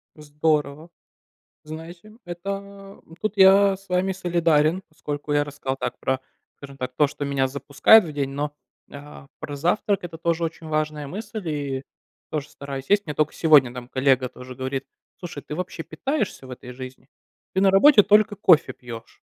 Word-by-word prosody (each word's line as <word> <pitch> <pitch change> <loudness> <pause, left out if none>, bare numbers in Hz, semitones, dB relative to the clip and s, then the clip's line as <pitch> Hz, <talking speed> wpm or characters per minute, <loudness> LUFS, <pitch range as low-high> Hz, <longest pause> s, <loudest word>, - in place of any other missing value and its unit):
Здорово. 150 +1 -1 0.8
Знаете, 170 +6 -10
это 195 +2 -7 0.2
тут 215 -1 -2
я 195 0 +6
с 195 0 -21
вами 180 +1 +1
солидарен, 170 -2 +1
поскольку 150 -1 -5
я 145 0 +3
рассказал 140 -2 -4
так - - -4
про, 130 0 -1 0.4
скажем 140 -1 -11
так, 125 -1 -5
то, 150 -2 +4
что 145 0 -6
меня 135 -1 0
запускает 145 +9 +5
в 155 - -7
день, 140 -2 -2
но, 145 +1 -3 0.4
а, 145 -1 -11
про 145 -1 -6
завтрак- 195 +5 +1
это 165 -1 -7
тоже 170 0 0
очень 160 0 -6
важная 155 -2 -2
мысль 210 -1 -6
и 140 -3 -3 0.5
тоже 150 -2 -4
стараюсь 140 -1 -7
есть. 205 -2 +3
Мне 150 - -4
только 155 0 +1
сегодня 145 -7 +5
там 125 0 -8
коллега 130 -1 +2
тоже 125 +1 -11
говорит: 130 +1 -4 0.3
"Слушай, 170 -6 -8
ты 150 - -7
вообще 180 -2 -5
питаешься 205 - -3
в - - -12
этой 125 0 -9
жизни? 130 +1 -10 0.4
Ты 190 - +1
на 195 -1 +5
работе 220 +2 +7
только 210 0 +4
кофе 175 -5 +4
пьёшь." 115 -2 -11
155 Hz, 170 wpm, -23 LUFS, 140-185 Hz, 0.8 s, работе